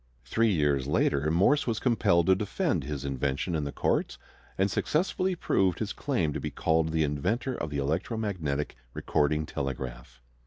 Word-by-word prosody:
Three 115 Hz, -1 st, +2 dB
years 75 Hz, -6 st, +1 dB
later 70 Hz, 0 st, +2 dB
Morse 95 Hz, -, +3 dB
was 115 Hz, -2 st, 0 dB
compelled 95 Hz, -9 st, +3 dB
to 95 Hz, -, +5 dB
defend 105 Hz, -, -1 dB
his 70 Hz, -1 st, -4 dB
invention 70 Hz, +5 st, -1 dB
in 75 Hz, -3 st, -1 dB
the 70 Hz, -, -3 dB
courts, -, -, 0 dB, 0.4 s
and 95 Hz, +1 st, +2 dB
successfully 185 Hz, -, 0 dB
proved 95 Hz, -, +1 dB
his 105 Hz, -2 st, -3 dB
claim 90 Hz, -, -1 dB
to -, -, -3 dB
be -, -, -3 dB
called 80 Hz, 0 st, +1 dB
the 80 Hz, -1 st, +2 dB
inventor 75 Hz, -, -1 dB
of 75 Hz, -10 st, -4 dB
the 75 Hz, -, -3 dB
electromagnetic 80 Hz, -, -2 dB, 0.2 s
recording 75 Hz, +1 st, +1 dB
telegraph. 65 Hz, -4 st, -5 dB
80 Hz, 160 wpm, -28 LUFS, 70-105 Hz, 0.4 s, to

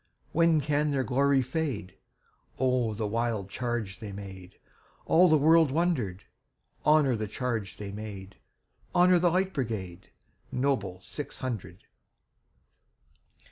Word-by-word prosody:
When 165 Hz, -2 st, +3 dB
can 150 Hz, +1 st, +1 dB
their 140 Hz, -2 st, 0 dB
glory 135 Hz, +1 st, +2 dB
fade?O 125 Hz, -, -3 dB
the 110 Hz, 0 st, -2 dB
wild 110 Hz, -2 st, -2 dB
charge 120 Hz, -6 st, -3 dB
they 105 Hz, -2 st, -7 dB
made! 95 Hz, -2 st, -10 dB, 0.5 s
All 180 Hz, +2 st, +5 dB
the 155 Hz, -, +6 dB
world 160 Hz, +1 st, +5 dB
wonder'd. 130 Hz, -, 0 dB, 0.6 s
Honor 150 Hz, -4 st, +4 dB
the 110 Hz, -1 st, -3 dB
charge 115 Hz, -3 st, -3 dB
they 100 Hz, -1 st, -6 dB
made! 100 Hz, -2 st, -8 dB, 0.6 s
Honor 180 Hz, 0 st, +6 dB
the 175 Hz, 0 st, +3 dB
Light 185 Hz, +2 st, 0 dB
Brigade, 100 Hz, -, -4 dB, 0.4 s
Noble 115 Hz, -9 st, -1 dB
six 145 Hz, +9 st, -7 dB
hundred! 100 Hz, -8 st, -5 dB
125 Hz, 115 wpm, -28 LUFS, 100-150 Hz, 0.6 s, the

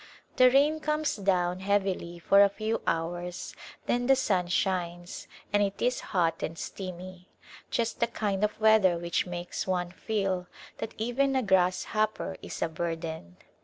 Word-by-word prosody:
The 255 Hz, 0 st, +8 dB
rain 290 Hz, +4 st, +3 dB
comes 305 Hz, -1 st, 0 dB
down 185 Hz, -3 st, +1 dB
heavily 190 Hz, -3 st, -1 dB
for 195 Hz, +4 st, +5 dB
a 200 Hz, -, +5 dB
few 215 Hz, +3 st, -2 dB
hours 175 Hz, +2 st, -2 dB, 0.3 s
then 245 Hz, 0 st, 0 dB
the 270 Hz, -, +6 dB
sun 190 Hz, -8 st, +1 dB
shines 175 Hz, -1 st, -2 dB, 0.3 s
and 205 Hz, -, +4 dB
it 200 Hz, -1 st, -1 dB
is 250 Hz, +1 st, +1 dB
hot 170 Hz, -3 st, +1 dB
and 165 Hz, -, -4 dB
steamy, 185 Hz, +1 st, -7 dB, 0.4 s
just 230 Hz, -1 st, -1 dB
the 235 Hz, -, +2 dB
kind 205 Hz, -3 st, -2 dB
of 210 Hz, 0 st, 0 dB
weather 215 Hz, -5 st, +5 dB
which 170 Hz, +1 st, -1 dB
makes 175 Hz, +1 st, -4 dB
one 180 Hz, -1 st, -1 dB
feel 190 Hz, -2 st, -2 dB, 0.3 s
that 225 Hz, -, -5 dB
even 265 Hz, +5 st, +1 dB
a 260 Hz, -, +2 dB
grass 185 Hz, -2 st, +3 dB
hopper 215 Hz, -3 st, 0 dB
is -, -, -4 dB
a -, -, +1 dB
burden. 160 Hz, -, -5 dB
190 Hz, 160 wpm, -28 LUFS, 175-220 Hz, 0.4 s, The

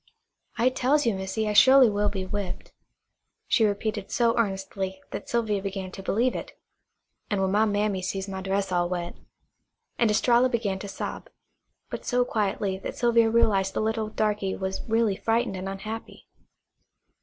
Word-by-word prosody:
"I 240 Hz, +2 st, +4 dB
tells 265 Hz, +3 st, +1 dB
you, 230 Hz, -, +2 dB
Missy, 190 Hz, +3 st, -2 dB
I 210 Hz, -, 0 dB
su'ly 260 Hz, +4 st, +8 dB
will 205 Hz, -1 st, +1 dB
be 190 Hz, -2 st, -4 dB
whipped," 200 Hz, -1 st, -5 dB, 0.7 s
she 225 Hz, -, +3 dB
repeated 210 Hz, 0 st, -2 dB
so 235 Hz, -1 st, +2 dB
earnestly 195 Hz, -3 st, -2 dB
that -, -, -6 dB
Sylvia 220 Hz, -4 st, 0 dB
began 195 Hz, -1 st, -5 dB
to 195 Hz, -, -8 dB
believe 235 Hz, +6 st, +1 dB
it. -, -, -7 dB, 0.7 s
"An' 205 Hz, -3 st, 0 dB
when 190 Hz, 0 st, +1 dB
my 210 Hz, +2 st, +3 dB
mammy 205 Hz, -2 st, 0 dB
sees 190 Hz, +1 st, -3 dB
my 190 Hz, -1 st, -5 dB
dress 195 Hz, 0 st, -1 dB
all 175 Hz, -1 st, +1 dB
wet 175 Hz, -1 st, -4 dB, 0.4 s
" -, -, -48 dB
and 230 Hz, -, +4 dB
Estralla 240 Hz, +4 st, +4 dB
began 210 Hz, -5 st, -1 dB
to 200 Hz, -, -6 dB
sob, 195 Hz, -, -6 dB, 0.6 s
but -, -, -5 dB
so 245 Hz, 0 st, +1 dB
quietly 200 Hz, -3 st, -1 dB
that -, -, -6 dB
Sylvia 235 Hz, -1 st, +4 dB
realized 200 Hz, -4 st, +2 dB
the -, -, 0 dB
little 220 Hz, 0 st, -1 dB
darky 210 Hz, -3 st, -1 dB
was 190 Hz, 0 st, -3 dB
really 225 Hz, -3 st, +2 dB
frightened 230 Hz, -1 st, 0 dB
and 190 Hz, +1 st, -4 dB
unhappy. 215 Hz, +4 st, -7 dB
205 Hz, 165 wpm, -26 LUFS, 195-230 Hz, 0.7 s, su'ly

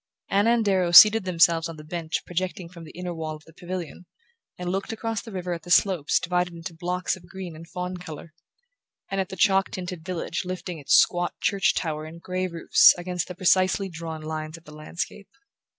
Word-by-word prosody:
Anna 205 Hz, +4 st, +4 dB
and 230 Hz, -2 st, +1 dB
Darrow 190 Hz, -3 st, +2 dB
seated 210 Hz, +4 st, +9 dB
themselves 165 Hz, -2 st, +3 dB
on 165 Hz, -, -8 dB
the 150 Hz, -, -10 dB
bench 160 Hz, 0 st, -4 dB
projecting 180 Hz, 0 st, -4 dB
from 170 Hz, -2 st, -12 dB
the -, -, -11 dB
inner 180 Hz, -1 st, -4 dB
wall 160 Hz, -1 st, -5 dB
of 155 Hz, -, -15 dB
the 160 Hz, -, -17 dB
pavilion 180 Hz, 0 st, -7 dB, 0.5 s
and 180 Hz, 0 st, -3 dB
looked 195 Hz, +5 st, -3 dB
across 225 Hz, 0 st, -3 dB
the 225 Hz, -, -11 dB
river 180 Hz, -2 st, -3 dB
at 170 Hz, -, -6 dB
the 175 Hz, -, -13 dB
slopes 175 Hz, -4 st, +3 dB
divided 180 Hz, -1 st, -1 dB
into 165 Hz, +1 st, -7 dB
blocks 180 Hz, +2 st, -2 dB
of 175 Hz, -2 st, -16 dB
green 185 Hz, -4 st, -7 dB
and 165 Hz, +1 st, -11 dB
fawn 180 Hz, 0 st, -4 dB
colour, 165 Hz, -2 st, -10 dB, 0.8 s
and 195 Hz, 0 st, 0 dB
at 190 Hz, -, -5 dB
the -, -, -6 dB
chalk 195 Hz, -1 st, +3 dB
tinted 180 Hz, -2 st, -6 dB
village 175 Hz, -1 st, -3 dB
lifting 180 Hz, -2 st, -5 dB
its 140 Hz, -, +3 dB
squat 175 Hz, 0 st, +3 dB
church 200 Hz, -1 st, +1 dB
tower 155 Hz, -2 st, -3 dB
and 165 Hz, +2 st, -11 dB
grey 185 Hz, 0 st, -2 dB
roofs 170 Hz, -2 st, +5 dB
against 180 Hz, 0 st, -3 dB
the 180 Hz, -, -7 dB
precisely 185 Hz, +1 st, +2 dB
drawn 160 Hz, -2 st, -7 dB
lines 155 Hz, 0 st, -5 dB
of 165 Hz, -, -18 dB
the 150 Hz, -, -13 dB
landscape. 165 Hz, +6 st, -6 dB
180 Hz, 205 wpm, -25 LUFS, 165-185 Hz, 0.8 s, seated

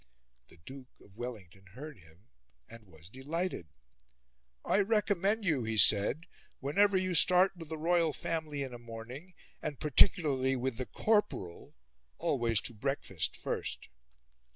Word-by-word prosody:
The -, -, -18 dB
Duke 130 Hz, +9 st, -13 dB
of 100 Hz, -, -20 dB
Wellington 100 Hz, -6 st, -8 dB
heard 150 Hz, +2 st, -9 dB
him, 80 Hz, +2 st, -21 dB, 0.4 s
and 115 Hz, -1 st, -13 dB
was 80 Hz, -2 st, -15 dB
delighted. 145 Hz, -, -4 dB, 1.0 s
"I -, -, +2 dB
recommend 205 Hz, 0 st, +1 dB
you," 150 Hz, -9 st, +1 dB
he 110 Hz, 0 st, -2 dB
said, 105 Hz, -, +5 dB, 0.4 s
"whenever 190 Hz, +8 st, +2 dB
you 185 Hz, -1 st, -1 dB
start 180 Hz, +3 st, +5 dB
with 165 Hz, -3 st, -10 dB
the 160 Hz, -, -4 dB
royal 165 Hz, 0 st, +2 dB
family 155 Hz, -3 st, -3 dB
in 130 Hz, -2 st, -7 dB
a 120 Hz, -, -8 dB
morning, 120 Hz, +9 st, -10 dB, 0.3 s
and 145 Hz, -, -5 dB
particularly 145 Hz, -4 st, +3 dB
with 130 Hz, -1 st, -2 dB
THE 130 Hz, -, -4 dB
CORPORAL, 210 Hz, -, -1 dB, 0.4 s
always 115 Hz, -5 st, +1 dB
to 120 Hz, -, -5 dB
breakfast 110 Hz, -, -3 dB
first." -, -, -4 dB
135 Hz, 135 wpm, -32 LUFS, 115-170 Hz, 1.0 s, said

